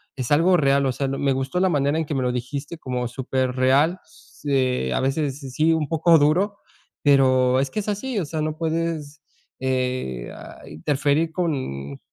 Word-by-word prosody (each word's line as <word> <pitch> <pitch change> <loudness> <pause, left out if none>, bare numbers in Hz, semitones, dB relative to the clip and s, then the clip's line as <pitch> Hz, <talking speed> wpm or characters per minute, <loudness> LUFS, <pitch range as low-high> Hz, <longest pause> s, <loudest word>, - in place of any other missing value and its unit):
es 130 -2 -4
algo 170 +5 +5
real, 140 -2 +3
o - - +1
sea, 135 +2 -2
no 135 - -2
me 140 -1 +2
gustó 135 +6 -2
la 190 - +3
manera 145 -1 +1
en 160 - 0
que 150 - -3
me 130 - 0
lo 125 - +1
dijiste 140 +6 -5
como 125 -4 -3
superreal. 130 +6 +1 0.5
Eh, 130 - +1
a - - 0
veces 135 +1 -1
sí 135 - -7
sí 160 +4 +2
un 155 -3 0
poco 165 +1 +5
duro, 180 +8 +2 0.5
pero 130 -2 +4
es 135 - 0
que - - -2
es 205 - -10
así, 225 +4 -3
o 180 - -2
sea, 155 +1 -3
no 155 0 -2
puedes, 160 -2 -3 0.4
eh, 125 - -2
ah, - - -12
interferir 145 - 0
con 100 - -3
140 Hz, 190 wpm, -23 LUFS, 130-160 Hz, 0.5 s, algo